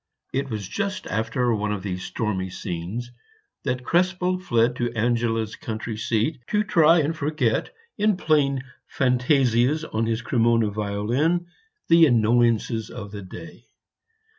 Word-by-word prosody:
It 135 +1 -1
was 105 -5 -4
just 200 - -3
after 115 +3 0
one 105 -1 -1
of 100 -3 -3
these 90 -2 -4
stormy 95 -5 -2
scenes 90 +8 -5 0.5
that 130 -2 -1
Krespel 180 +3 +1
fled 120 -8 +1
to 120 -1 -1
Angela's 115 -1 0
country 110 0 -5
seat 115 +5 -1
to 210 0 +1
try 165 -5 +5
and 155 +2 -1
forget 145 -7 0 0.3
in 210 -2 +3
playing 140 -6 +1 0.3
fantasias 125 +2 +2
on 110 +1 0
his 115 +1 -1
Cremona 115 -3 +2
violin 110 +12 0 0.4
the 165 -1 +7
annoyances 115 -2 +2
of 100 -4 -8
the 105 -1 -7
day. 95 - -11
120 Hz, 135 wpm, -24 LUFS, 110-150 Hz, 0.5 s, the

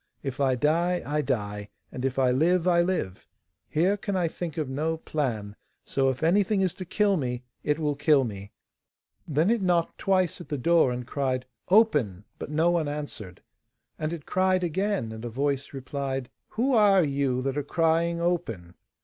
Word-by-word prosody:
If 135 -2 -4
I 135 -2 +3
die, 170 +7 +1
I 150 +1 0
die, 105 -5 -3 0.2
and 125 - -6
if 135 -1 -1
I 130 -2 +3
live, 170 +7 +2
I 170 -1 +4
live. 175 - -2 0.4
Here 180 +6 +2
can 200 0 -3
I 180 -2 +1
think 165 0 -6
of 155 -3 -1
no 155 +5 -1
plan, 115 -11 -3 0.3
so 135 -1 +1
if 130 +3 -3
anything 200 +4 +3
is 185 -3 +1
to - - -3
kill 200 +2 +2
me, 125 -4 -3 0.2
it 150 0 +1
will 150 -2 0
kill 145 -1 +4
me.' 100 -3 -6 0.8
Then 160 +7 +2
it 235 -2 +1
knocked 175 -3 +1
twice 185 -4 +1
at - - -11
the 145 - -2
door, 165 0 +3
and 125 0 -4
cried 130 -1 -2 0.2
'Open,' 150 - +3 0.2
but - - -6
no 160 +3 +2
one 170 -3 +1
answered. 145 -11 -6 0.6
And 155 +1 -2
it 165 -4 -6
cried 185 0 +1
again, 190 - -1
and 110 0 -8
a 120 - -4
voice 140 +3 -2
replied: 135 -1 -4 0.2
'Who 255 +5 0
are 205 -5 +5
you 135 -3 0
that 135 0 -1
are 145 - 0
crying 165 +3 +1
"Open"? 140 - -2
150 Hz, 185 wpm, -27 LUFS, 130-175 Hz, 0.8 s, are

